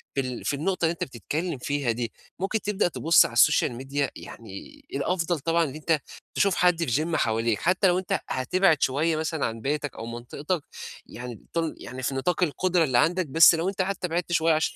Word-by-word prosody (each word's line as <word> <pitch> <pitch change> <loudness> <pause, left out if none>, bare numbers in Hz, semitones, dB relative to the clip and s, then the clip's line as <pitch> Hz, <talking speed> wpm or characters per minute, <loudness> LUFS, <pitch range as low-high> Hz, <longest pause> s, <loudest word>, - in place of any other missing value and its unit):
في 135 - +2
ال 125 -2 -6
في 145 - 0
النُقطة 175 +3 -1
اللي 160 - +2
أنت - - -4
بتتكلّم 150 - -4
فيها 140 -1 -1
دي. 115 0 -4 0.3
ممكن 195 +3 -1
تبدأ 205 -3 0
تبُص 165 -1 +4
على - - -5
السوشيال 130 0 +4
ميديا 135 +3 -2
يعني 115 - -11
الأفضل 175 -2 0
طبعًا 165 +3 +1
أن 145 -3 -4
أنت 155 0 0 0.4
تشوف 195 -2 +3
حد 180 -2 +3
في 150 +7 +1
gym 170 - -2
حواليك. 115 -4 +1
حتّى 185 +3 +3
لو 180 +1 +3
أنت 185 - -1
هتبعد 155 +4 +2
شوية 155 +5 +1
مثلًا 160 -1 -1
عن 115 0 -4
بيتك 145 0 -2
أو 115 - -7
منطقتك. 140 +8 -4 0.4
يعني 120 -2 -9
تن 165 -2 -1
يعني 130 +1 -8
في 135 - -1
نِطاق 175 +7 0
القُدرة 175 +2 +1
اللي 130 -5 +1
عندك. 175 +6 +2
بس 165 +4 +7
لو 170 +4 -1
أنت 195 -1 -2
حتّى 190 -1 -2
بعدت 175 +1 -2
شوية 165 -1 +3
عشان 155 +1 0
160 Hz, 205 wpm, -26 LUFS, 130-175 Hz, 0.4 s, بس